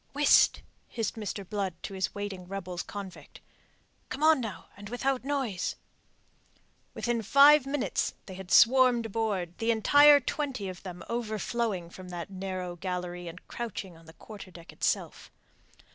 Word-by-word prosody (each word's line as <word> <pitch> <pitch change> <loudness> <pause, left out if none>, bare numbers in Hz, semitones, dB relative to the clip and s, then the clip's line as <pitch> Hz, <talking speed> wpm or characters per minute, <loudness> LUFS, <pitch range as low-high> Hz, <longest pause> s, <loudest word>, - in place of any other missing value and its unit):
"Whist!" 290 0 +4 0.2
hissed 225 -3 -3
Mr. 205 -3 -5
Blood 195 -4 -2
to - - -6
his 190 -1 -2
waiting 200 -3 -5
rebels 185 -2 -5
convict. 200 -3 -9 0.7
"Come 290 - -4
on, 315 -3 +5
now, 220 -4 -6
and 205 +1 -10
without 255 +2 -1
noise." 265 -10 -2 1.2
Within 240 -1 -1
five 280 +5 +6
minutes 280 -1 -1
they 190 - -9
had 190 0 -9
swarmed 245 +1 +5
aboard, 200 -6 -2
the 225 - -1
entire 285 +6 +7
twenty 270 -6 -3
of 185 -1 -7
them 180 -2 -8
overflowing 220 -5 -2
from 185 0 -11
that 175 +2 -6
narrow 185 -2 -5
gallery 180 -1 -5
and 170 +2 -10
crouching 210 -6 -6
on 165 0 -18
the 160 - -13
quarter 205 +1 -11
deck 170 -1 -13
itself. - - -2
205 Hz, 145 wpm, -29 LUFS, 185-240 Hz, 1.2 s, entire